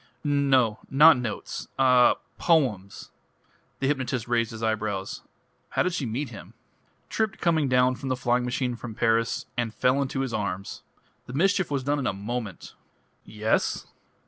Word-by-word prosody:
"No 135 Hz, -6 st, +2 dB
not 155 Hz, +4 st, +7 dB
notes.... 120 Hz, -4 st, -5 dB
Ah 125 Hz, -2 st, +5 dB, 0.2 s
poems." 115 Hz, -, 0 dB, 0.7 s
The 135 Hz, -, -2 dB
hypnotist 130 Hz, -4 st, -1 dB
raised 115 Hz, -2 st, +1 dB
his 115 Hz, 0 st, -8 dB
eyebrows. 105 Hz, -3 st, -2 dB, 0.5 s
"How -, -, +1 dB
did 180 Hz, -, -1 dB
she 145 Hz, -8 st, -2 dB
meet 125 Hz, +5 st, -3 dB
him?" 100 Hz, 0 st, -11 dB, 0.5 s
"Tripped 220 Hz, -3 st, -1 dB
coming 160 Hz, -4 st, +2 dB
down 125 Hz, 0 st, +4 dB
from 130 Hz, +1 st, -6 dB
the 130 Hz, -, +1 dB
flying 125 Hz, 0 st, +1 dB
machine 125 Hz, 0 st, -1 dB
from 115 Hz, -1 st, -8 dB
Paris 115 Hz, 0 st, +1 dB
and 115 Hz, -2 st, -2 dB
fell 130 Hz, +2 st, +2 dB
into 135 Hz, 0 st, -2 dB
his 130 Hz, -3 st, -3 dB
arms. 100 Hz, -2 st, -4 dB, 0.5 s
The 125 Hz, -, -8 dB
mischief 190 Hz, +4 st, +2 dB
was 140 Hz, -2 st, -1 dB
done 145 Hz, +2 st, 0 dB
in 130 Hz, -, -1 dB
a -, -, 0 dB
moment!" 105 Hz, 0 st, -5 dB, 0.5 s
"Yes?" 110 Hz, +1 st, -1 dB
125 Hz, 155 wpm, -26 LUFS, 110-140 Hz, 0.7 s, not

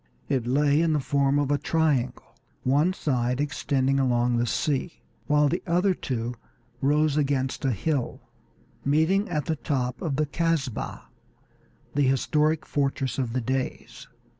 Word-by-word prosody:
It 130 Hz, -4 st, 0 dB
lay 145 Hz, +3 st, +3 dB
in 165 Hz, -1 st, +2 dB
the 150 Hz, -, +2 dB
form 140 Hz, 0 st, +1 dB
of 145 Hz, -1 st, +1 dB
a 145 Hz, -, +2 dB
triangle, 140 Hz, -7 st, 0 dB, 0.3 s
one 145 Hz, +7 st, +3 dB
side 125 Hz, -7 st, -1 dB
extending 135 Hz, -1 st, 0 dB
along 120 Hz, -2 st, +2 dB
the 120 Hz, +1 st, +1 dB
sea, 145 Hz, +6 st, -2 dB, 0.2 s
while 150 Hz, 0 st, +4 dB
the 175 Hz, +5 st, -1 dB
other 180 Hz, +3 st, +3 dB
two 120 Hz, -7 st, -3 dB, 0.5 s
rose 150 Hz, +1 st, +2 dB
against 135 Hz, -2 st, 0 dB
a 135 Hz, -, +3 dB
hill, 130 Hz, -, -2 dB, 0.6 s
meeting 160 Hz, +8 st, +2 dB
at 150 Hz, -4 st, -1 dB
the 160 Hz, -, -1 dB
top 130 Hz, -4 st, -2 dB
at 155 Hz, -7 st, -2 dB
the 155 Hz, -, +2 dB
Casbah, 150 Hz, -4 st, -2 dB, 0.9 s
the 145 Hz, -, +1 dB
historic 150 Hz, +3 st, +2 dB
fortress 135 Hz, -2 st, -1 dB
of 120 Hz, -3 st, -2 dB
the 130 Hz, -, 0 dB
Deys. 130 Hz, +2 st, -4 dB
140 Hz, 145 wpm, -26 LUFS, 130-155 Hz, 0.9 s, while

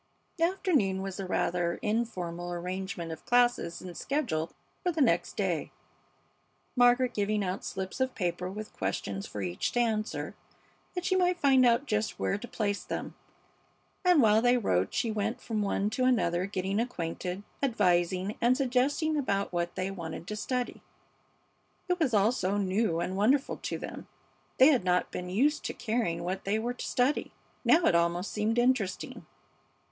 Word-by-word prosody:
The 330 Hz, -, +5 dB
afternoon 290 Hz, -, +1 dB
was 195 Hz, 0 st, -5 dB
a 195 Hz, -, -3 dB
rather 175 Hz, -1 st, 0 dB
informal 180 Hz, -6 st, -2 dB
arrangement 180 Hz, -1 st, -4 dB
of 160 Hz, -, -8 dB
classes 240 Hz, -8 st, +2 dB
and 180 Hz, -2 st, -8 dB
schedule 235 Hz, -, -1 dB, 0.3 s
for 360 Hz, -, +1 dB
the 325 Hz, -, -4 dB
next 280 Hz, -, +2 dB
day, -, -, -1 dB, 1.1 s
Margaret 245 Hz, 0 st, +4 dB
giving 210 Hz, 0 st, 0 dB
out 185 Hz, 0 st, -3 dB
slips 190 Hz, +4 st, -5 dB
of 260 Hz, 0 st, 0 dB
paper 180 Hz, -2 st, -2 dB
with 210 Hz, +3 st, -7 dB
questions 95 Hz, +1 st, -3 dB
for 105 Hz, -, -5 dB
each 90 Hz, -1 st, -2 dB
to 245 Hz, -, +1 dB
answer, 220 Hz, -2 st, -1 dB, 0.6 s
that 360 Hz, 0 st, -3 dB
she 375 Hz, -, +2 dB
might 360 Hz, -1 st, +2 dB
find 265 Hz, -4 st, +5 dB
out 240 Hz, +4 st, +3 dB
just 215 Hz, -3 st, -1 dB
where 195 Hz, -, -1 dB
to 245 Hz, -, -7 dB
place 205 Hz, -4 st, -2 dB
them; -, -, -5 dB, 0.9 s
and 355 Hz, -7 st, +5 dB
while 215 Hz, 0 st, +5 dB
they 245 Hz, +1 st, +4 dB
wrote 95 Hz, -, +1 dB
she 240 Hz, -2 st, 0 dB
went 215 Hz, +2 st, -2 dB
from 220 Hz, -2 st, -2 dB
one 200 Hz, +1 st, 0 dB
to 255 Hz, +4 st, 0 dB
another, 185 Hz, -8 st, +2 dB
getting 195 Hz, +1 st, -1 dB
acquainted, 180 Hz, -4 st, -3 dB, 0.2 s
advising, 185 Hz, -5 st, +1 dB
and 245 Hz, +2 st, +4 dB
suggesting 275 Hz, +4 st, +1 dB
about 200 Hz, -9 st, -1 dB
what 175 Hz, 0 st, -1 dB
they 185 Hz, +1 st, -2 dB
wanted 170 Hz, -3 st, -6 dB
to 210 Hz, -, -3 dB
study. 250 Hz, +3 st, -3 dB, 1.1 s
It 360 Hz, 0 st, 0 dB
was 265 Hz, -9 st, +2 dB
all 205 Hz, +2 st, +4 dB
so 200 Hz, -5 st, -1 dB
new 195 Hz, -2 st, +1 dB
and 180 Hz, +2 st, -2 dB
wonderful 260 Hz, +8 st, +2 dB
to -, -, -4 dB
them! -, -, -8 dB, 0.5 s
They 260 Hz, +3 st, +8 dB
had 260 Hz, -9 st, +3 dB
not 180 Hz, 0 st, +1 dB
been 180 Hz, 0 st, -5 dB
used 280 Hz, +11 st, +2 dB
to -, -, -3 dB
caring 215 Hz, -8 st, -1 dB
what 185 Hz, +2 st, -3 dB
they 200 Hz, +2 st, +1 dB
were 235 Hz, +3 st, -2 dB
to 245 Hz, -, -6 dB
study. 255 Hz, +4 st, +1 dB, 0.3 s
Now 335 Hz, +1 st, +5 dB
it -, -, +4 dB
almost 170 Hz, +2 st, +1 dB
seemed 215 Hz, +2 st, 0 dB
interesting. 240 Hz, -6 st, 0 dB
210 Hz, 170 wpm, -29 LUFS, 180-250 Hz, 1.1 s, They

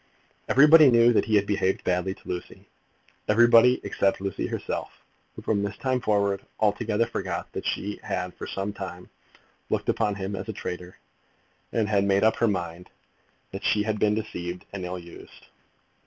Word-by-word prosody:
Everybody 150 Hz, +2 st, +8 dB
knew 120 Hz, 0 st, +5 dB
that -, -, +2 dB
he 110 Hz, -, +1 dB
had 100 Hz, -1 st, +3 dB
behaved 100 Hz, -2 st, 0 dB
badly 90 Hz, +1 st, -1 dB
to -, -, -20 dB
Lucy, 90 Hz, -1 st, -7 dB, 0.6 s
everybody, 120 Hz, +3 st, +6 dB
except 100 Hz, -1 st, 0 dB
Lucy 100 Hz, 0 st, -3 dB
herself, -, -, -4 dB, 0.5 s
who, -, -, -10 dB
from 105 Hz, -2 st, 0 dB
this 100 Hz, 0 st, -4 dB
time 130 Hz, -1 st, -1 dB
forward, 100 Hz, -4 st, +1 dB, 0.2 s
altogether 110 Hz, +1 st, +1 dB
forgot 95 Hz, -6 st, -4 dB
that -, -, -4 dB
she 105 Hz, +1 st, -3 dB
had 90 Hz, 0 st, -3 dB
for -, -, -8 dB
some 100 Hz, +1 st, -4 dB
time 95 Hz, -2 st, -8 dB, 0.6 s
looked -, -, -1 dB
upon 105 Hz, -1 st, +1 dB
him 100 Hz, 0 st, -4 dB
as 95 Hz, +4 st, -6 dB
a -, -, -2 dB
traitor, 90 Hz, -2 st, -7 dB, 0.7 s
and 110 Hz, -2 st, 0 dB
had 100 Hz, -2 st, +2 dB
made 100 Hz, 0 st, +2 dB
up 110 Hz, 0 st, +3 dB
her 115 Hz, -, +2 dB
mind 90 Hz, -3 st, -3 dB, 0.6 s
that -, -, -7 dB
she 105 Hz, -, +2 dB
had 105 Hz, 0 st, -2 dB
been 105 Hz, 0 st, +2 dB
deceived 90 Hz, -5 st, -5 dB
and 95 Hz, -2 st, -5 dB
ill 90 Hz, +1 st, -4 dB
used. 85 Hz, -1 st, -13 dB
100 Hz, 170 wpm, -26 LUFS, 95-110 Hz, 0.7 s, Everybody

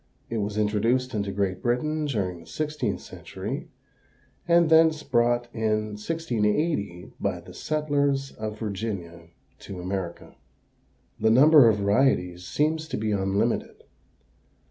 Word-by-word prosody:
It 115 Hz, -, -1 dB
was 105 Hz, 0 st, -3 dB
introduced 115 Hz, +5 st, +1 dB
into 100 Hz, -2 st, -2 dB
Great 95 Hz, -1 st, -1 dB
Britain 150 Hz, +6 st, 0 dB
during 95 Hz, -9 st, -2 dB
the 80 Hz, -, -15 dB
sixteenth 150 Hz, -, -2 dB
century, -, -, -7 dB, 0.8 s
and 170 Hz, -1 st, +5 dB
thence 160 Hz, -1 st, +5 dB
brought 120 Hz, -1 st, +2 dB
in 110 Hz, -1 st, 0 dB
1680 110 Hz, -, -1 dB
by -, -, -1 dB
the -, -, -13 dB
settlers 145 Hz, -3 st, 0 dB
of 110 Hz, 0 st, -6 dB
Virginia 100 Hz, -6 st, -5 dB, 0.3 s
to 95 Hz, -2 st, -8 dB
America." 90 Hz, -1 st, -5 dB, 0.8 s
The 110 Hz, -, +3 dB
number 140 Hz, +2 st, +7 dB
of 110 Hz, -, +2 dB
varieties 100 Hz, -4 st, +1 dB
seems 155 Hz, +1 st, 0 dB
to -, -, -3 dB
be 110 Hz, 0 st, -1 dB
unlimited. 95 Hz, 0 st, -1 dB
110 Hz, 120 wpm, -26 LUFS, 100-145 Hz, 0.8 s, number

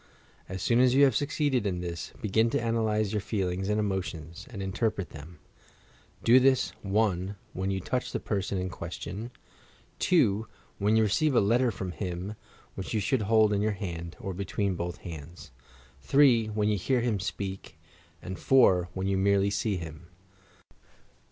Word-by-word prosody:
As 95 Hz, 0 st, -5 dB
soon 120 Hz, 0 st, +3 dB
as 125 Hz, 0 st, +5 dB
you 140 Hz, -, +6 dB
have 135 Hz, -5 st, +5 dB
succeeded 145 Hz, -6 st, +1 dB
in 90 Hz, -2 st, -2 dB
this, 85 Hz, -1 st, -5 dB
begin 110 Hz, +2 st, +2 dB
to -, -, 0 dB
analyse 110 Hz, -3 st, 0 dB
your 105 Hz, -2 st, -1 dB
feelings 95 Hz, -2 st, -2 dB
and 105 Hz, 0 st, +1 dB
emotions, 90 Hz, -4 st, -4 dB
and 110 Hz, -, -8 dB
interpret 95 Hz, 0 st, -2 dB
them. 80 Hz, +3 st, -11 dB, 0.9 s
Do 120 Hz, +3 st, +7 dB
this, 130 Hz, 0 st, +3 dB
(1) 100 Hz, -1 st, 0 dB, 0.2 s
when 95 Hz, +1 st, -2 dB
you 95 Hz, -1 st, -1 dB
touch 125 Hz, +7 st, -2 dB
the -, -, -2 dB
person 100 Hz, -2 st, -2 dB
in 90 Hz, 0 st, -2 dB
question; 95 Hz, +6 st, -6 dB, 0.7 s
(2) 110 Hz, -, +3 dB, 0.3 s
when 105 Hz, +2 st, +2 dB
you 110 Hz, -, +5 dB
receive 130 Hz, +8 st, +2 dB
a -, -, +6 dB
letter 120 Hz, +5 st, +3 dB
from 95 Hz, -5 st, -4 dB
him, 90 Hz, +2 st, -4 dB, 0.4 s
which 95 Hz, +4 st, -5 dB
you -, -, +2 dB
should 105 Hz, +5 st, +1 dB
hold 110 Hz, 0 st, +4 dB
in 100 Hz, -, +1 dB
your 105 Hz, 0 st, +1 dB
hand 85 Hz, -4 st, -6 dB
— -, -, -24 dB
or 95 Hz, -, -4 dB
between 100 Hz, +1 st, -1 dB
both 85 Hz, 0 st, -4 dB
hands; 85 Hz, -1 st, -9 dB, 0.5 s
(3) 130 Hz, -6 st, +4 dB
when 105 Hz, -1 st, 0 dB
you 105 Hz, -2 st, +1 dB
hear 125 Hz, +6 st, +1 dB
him 115 Hz, -4 st, 0 dB
speah; 95 Hz, -3 st, -5 dB, 0.5 s
and 95 Hz, 0 st, -6 dB
(4) 95 Hz, -10 st, +4 dB
when 95 Hz, 0 st, -2 dB
you 95 Hz, 0 st, +1 dB
merely 100 Hz, 0 st, +3 dB
see 100 Hz, 0 st, 0 dB
him. 80 Hz, -1 st, -8 dB
100 Hz, 170 wpm, -28 LUFS, 95-110 Hz, 0.9 s, Do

